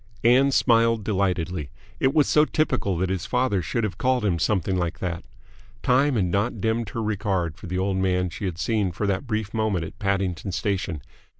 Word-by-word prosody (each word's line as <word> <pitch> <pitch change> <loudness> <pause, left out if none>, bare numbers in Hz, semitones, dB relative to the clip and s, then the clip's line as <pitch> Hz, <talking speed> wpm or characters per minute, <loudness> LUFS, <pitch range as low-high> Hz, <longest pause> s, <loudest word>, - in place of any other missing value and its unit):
Ann 125 +4 +5
smiled 115 -4 +3
delightedly. 90 -6 -1 0.3
It 130 - +3
was 150 -2 +3
so 150 - +5
typical 155 - 0
that 95 +2 0
his 95 -3 -3
father 125 -6 +1
should 115 +8 -2
have 95 -6 -3
called 130 -3 +1
him 85 -5 +1
something 95 0 +1
like 85 -2 -1
that. 85 -1 -4 0.6
Time 135 +2 +3
had 100 -5 +2
not 100 +6 -1
dimmed 110 +1 -1
her 115 +2 -3
regard 95 -6 -1
for 95 - -10
the 90 +1 -3
old 95 0 0
man 90 -1 +1
she 95 +4 -5
had 90 -3 -3
seen 105 -1 0
for 95 +5 -3
that 100 +5 -1
brief 110 -2 -2
moment 110 -7 0
at - - -11
Paddington 95 -2 -1
Station. 95 -7 -2
100 Hz, 195 wpm, -24 LUFS, 90-115 Hz, 0.6 s, Ann